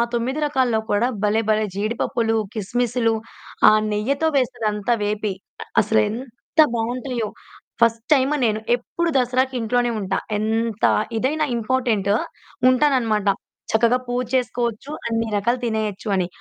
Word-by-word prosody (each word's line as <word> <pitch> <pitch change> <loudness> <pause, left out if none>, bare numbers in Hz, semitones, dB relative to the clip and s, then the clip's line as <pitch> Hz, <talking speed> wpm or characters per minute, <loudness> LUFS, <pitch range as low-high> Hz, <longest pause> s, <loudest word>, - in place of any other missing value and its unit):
9 260 +6 -1
రకాల్లో 255 -6 +1
కూడా 215 +4 +2 0.2
భలే 215 +2 +2
భలే 215 0 +2
జీడిపప్పులు, 225 +2 0 0.2
కిస్‌మిస్లు 230 +2 0 0.6
ఆ - - +6 0.2
నెయ్యితో 275 +10 0
వేసేదంతా 225 -3 0
వేపి. 210 -1 -1 0.5
అసలేంత 220 +7 -2 0.2
బావుంటాయో 240 0 -2 0.5
ఫస్ట్ 230 0 +3
టైమ్ 270 +1 +2
నేను 215 -1 +1 0.2
ఎప్పుడు 335 +8 -3
దసరాకి 255 +1 +1
ఇంట్లోనే 240 +2 +1
ఉంటా. 190 -1 -1 0.2
ఎంత 225 0 0 0.3
ఇదైనా 300 +6 0
ఇంపార్టెంటు 225 -4 +1 0.6
ఉంటాను 275 +2 +3
అన్నమాట. 215 -3 -1 0.4
చక్కగా 235 +3 +3
పూజ 245 +1 -1
చేసుకోవచ్చు 240 +1 -1 0.2
అన్ని 230 0 -1
రకాలు 235 +5 +1
తినేయొచ్చు 220 -2 -2
అని. 180 -2 0
230 Hz, 115 wpm, -22 LUFS, 215-250 Hz, 0.6 s, ఆ